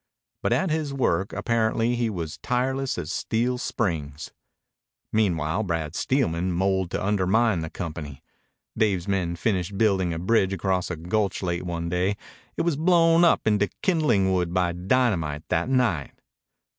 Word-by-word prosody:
But - - 0
at 190 -4 +1
his 155 -2 -1
work 95 -7 0
apparently 115 0 0
he 120 -1 0
was 85 -5 -5
tireless 130 +2 -1
as 85 -4 -4
steel 125 +2 -1
springs. 80 - -3 0.8
Meanwhile 90 -4 +1
Brad 85 -6 -2
Steelman 90 -10 0
moled 95 0 0
to - - -3
undermine 105 +1 +2
the 80 0 -4
company. 75 -6 -7 0.5
Dave's 100 -5 +1
men 90 -3 0
finished 95 0 -1
building 95 -5 +2
a 80 - -3
bridge 95 +2 +2
across 95 -1 -1
a 90 - -3
gulch 95 +5 -1
late 85 0 -2
one 85 -1 -3
day. 90 +4 0 0.4
It - - +1
was 165 -4 0
blown 165 0 +4
up 170 - +4
into 105 -2 +2
kindling 120 - +2
wood 90 -1 -1
by 90 -1 +2
dynamite 90 - 0
that - - 0
night. 120 - 0
95 Hz, 150 wpm, -25 LUFS, 85-115 Hz, 0.8 s, blown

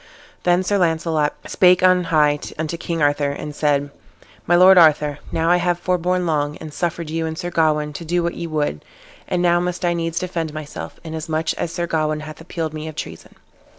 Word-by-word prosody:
Then 175 +1 +2
Sir 200 +1 +1
Launcelot 160 -3 +1
spake 180 0 +4
on 185 -1 +4
high 150 -3 +3 0.2
unto 155 +1 -3
King 165 -1 -2
Arthur, 145 0 +2
and 145 +1 -6
said, 145 -1 +1 0.6
"My 175 - +4
lord 185 +2 +8
Arthur, 150 -4 +4
now 165 +1 +1
I 180 - +5
have 175 0 0
forborne 180 0 0
long, 150 -2 -1
and 155 -2 -9
suffered 170 -2 -3
you 165 0 -1
and 160 0 -5
Sir 175 0 -4
Gawain 150 -2 +1
to 170 - -7
do 175 +2 0
what 170 - -1
ye 170 - -5
would, 150 - -2 0.4
and 180 -1 0
now 175 0 +4
must 180 +1 -2
I 175 - +2
needs 165 -1 -3
defend 165 -4 -3
myself, 155 -1 -7
inasmuch 160 0 -2
as 165 - -4
Sir 170 0 -2
Gawain 155 -2 -1
hath 155 +1 -9
appealed 165 -2 -4
me 155 0 -6
of 155 - -7
treason." 80 - -8
165 Hz, 200 wpm, -21 LUFS, 155-175 Hz, 0.6 s, lord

